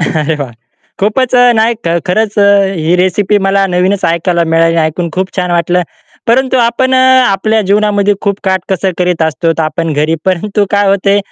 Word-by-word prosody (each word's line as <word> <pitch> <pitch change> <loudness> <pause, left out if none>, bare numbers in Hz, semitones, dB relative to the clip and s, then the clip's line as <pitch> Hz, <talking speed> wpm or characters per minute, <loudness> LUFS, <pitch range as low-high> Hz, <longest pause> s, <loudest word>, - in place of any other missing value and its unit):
अरे, 160 -1 -1
वाह! 140 -4 -5 0.5
खूपच 235 +6 0
अ, 245 0 +5
नाही 225 +2 +2 0.3
खरंच 210 +3 -1
अ, 205 - +4 0.3
ही 165 +1 0
रेसिपी 185 +3 +1
मला 195 0 +1
नवीनच 185 +2 0
ऐकायला 170 +1 0
मिळाली 165 0 +2
ऐकून 165 +2 -1
खूप 185 +2 -3
छान 180 -1 -1
वाटलं 175 +1 +1 0.4
परंतु 260 +3 +1
आपण 260 +3 0
अ, - - +3 0.3
आपल्या 215 +3 0
जीवनामध्ये 205 0 +1
खूप 200 -1 -2
काटकसर 190 0 -1
करीत 180 -2 0
असतो 160 +1 0
तर - - +1
आपण 155 +1 -2
घरी 150 +2 0
परंतु 195 +3 0
काय 205 0 +1
होते 200 +1 +2
190 Hz, 170 wpm, -11 LUFS, 170-205 Hz, 0.5 s, अ